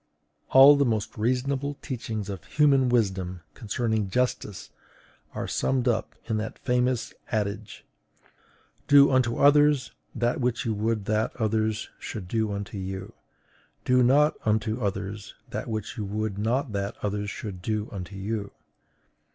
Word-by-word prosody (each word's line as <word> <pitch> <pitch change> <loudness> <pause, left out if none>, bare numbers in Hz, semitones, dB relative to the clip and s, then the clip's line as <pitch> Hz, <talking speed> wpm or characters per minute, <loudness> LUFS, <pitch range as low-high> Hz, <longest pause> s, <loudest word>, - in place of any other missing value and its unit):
All 135 +2 +9
the 140 - +4
most 110 -4 -1
reasonable 130 +5 -1
teachings 110 -6 -4
of 95 -5 -6
human 140 -4 +3
wisdom 95 -6 0
concerning 110 -2 -1
justice 115 -3 -2 0.6
are - - -3
summed 130 -2 0
up 120 - 0
in 110 - -1
that 110 +1 -4
famous 125 -1 0 0.2
adage: 105 -1 -3 1.0
DO 140 0 +7
UNTO 125 -3 +2
OTHERS 145 -1 +4 0.2
THAT 120 +2 0
WHICH 120 -1 0
YOU 115 - 0
WOULD 110 0 -1
THAT 110 +1 0
OTHERS 110 0 0
SHOULD 105 -6 -6
DO 110 +1 0
UNTO 100 0 -5
YOU; 95 0 -6 0.7
DO 125 0 +4
NOT 145 +5 +5
UNTO 110 +2 0
OTHERS 100 0 -4 0.2
THAT - - -4
WHICH 110 +3 -4
YOU 105 - -3
WOULD 105 0 -3
NOT 120 +4 0
THAT 100 0 -3
OTHERS 105 0 -2
SHOULD 100 -3 -7
DO 110 +2 -2
UNTO 100 -1 -7
YOU. 100 +1 -4
110 Hz, 140 wpm, -26 LUFS, 105-125 Hz, 1.0 s, All